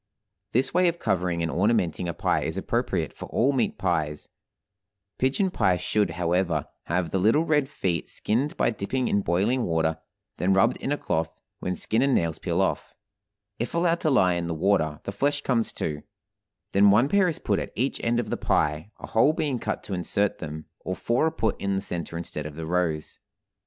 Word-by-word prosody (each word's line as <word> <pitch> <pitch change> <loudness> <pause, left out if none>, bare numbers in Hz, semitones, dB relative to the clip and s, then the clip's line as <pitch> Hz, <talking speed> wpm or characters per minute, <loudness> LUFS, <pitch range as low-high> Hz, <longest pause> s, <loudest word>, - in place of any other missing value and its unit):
This 125 +3 +2
way 180 0 +4
of 170 0 0
covering 90 - 0
and 80 - -1
ornamenting 90 -4 +1
a - - -2
pie - - +1
is - - -3
appropriate - - -1
for - - -8
all 135 +4 +2
meat 130 -3 0
pies; 80 -5 -1 0.9
pigeon 140 +9 +1
pie 95 - +2
should, 100 +2 +1
however, 85 -3 +1 0.2
have 85 -1 -1
the 95 - +1
little 115 - +3
red 150 -4 +2
feet 85 - -2
skinned 130 +8 -1
by - - +2
dipping 120 +5 -2
in 100 - +2
boiling 100 +9 +1
water, 80 -2 0 0.4
then 95 +1 +2
rubbed 95 - +3
in 135 - -3
a 145 - +1
cloth, 80 - -2 0.2
when 90 - -2
skin 110 +6 0
and 135 -1 +3
nails 85 -1 0
peel - - 0
off; - - -2 0.6
if 120 - -3
allowed 170 0 +2
to 155 - +1
lie 95 -10 +4
in 85 -1 -2
the 85 - -2
water, 80 -4 +1
the - - -4
flesh 145 +8 0
comes 115 -4 +1
too; 75 -2 -3 0.7
then 100 +1 +6
one 110 +6 +5
pair 195 +3 +3
is 165 - -1
put 100 - 0
at - - -5
each 130 +4 -1
end 120 0 +2
of 120 - -3
the - - 0
pie, 75 +6 0
a - - -7
hole 130 +7 +3
being 150 -6 -1
cut 105 - -3
to 100 - -6
insert 95 +3 0
them, 80 -1 -6
or 95 - -4
four 120 +10 +1
are - - 0
put 160 - -1
in 100 0 0
the 95 - -1
center 85 -1 -5
instead 75 -3 -5
of 75 - -9
the 80 0 -5
rose. 80 -3 -1
100 Hz, 205 wpm, -26 LUFS, 85-130 Hz, 0.9 s, then